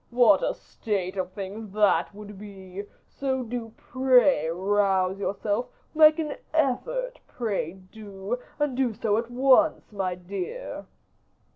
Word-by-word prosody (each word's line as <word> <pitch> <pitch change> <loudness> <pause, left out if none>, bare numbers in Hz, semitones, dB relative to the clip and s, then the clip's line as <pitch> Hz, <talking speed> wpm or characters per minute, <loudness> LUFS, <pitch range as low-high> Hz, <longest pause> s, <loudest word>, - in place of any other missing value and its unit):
What 235 -5 +5
a - - 0
state 195 -3 -3
of 185 -1 -3
things 205 +2 -6
that 210 -1 +2
would 210 -1 -10
be! 195 -1 -9 0.2
So 265 -2 -2
do 235 -1 -5
pray 255 - +3
rouse 190 +1 +1
yourself; 205 +3 -1 0.3
make 310 -1 +7
an 305 -3 -3 0.2
effort, - - 0
pray 205 -8 -2
do, 195 +3 -7 0.2
and 295 -3 0
do 250 -4 0
so 215 -1 +1
at 235 0 -5
once, 265 +5 +3
my 190 -3 -2
dear." 190 - -6
210 Hz, 130 wpm, -26 LUFS, 195-255 Hz, 0.3 s, make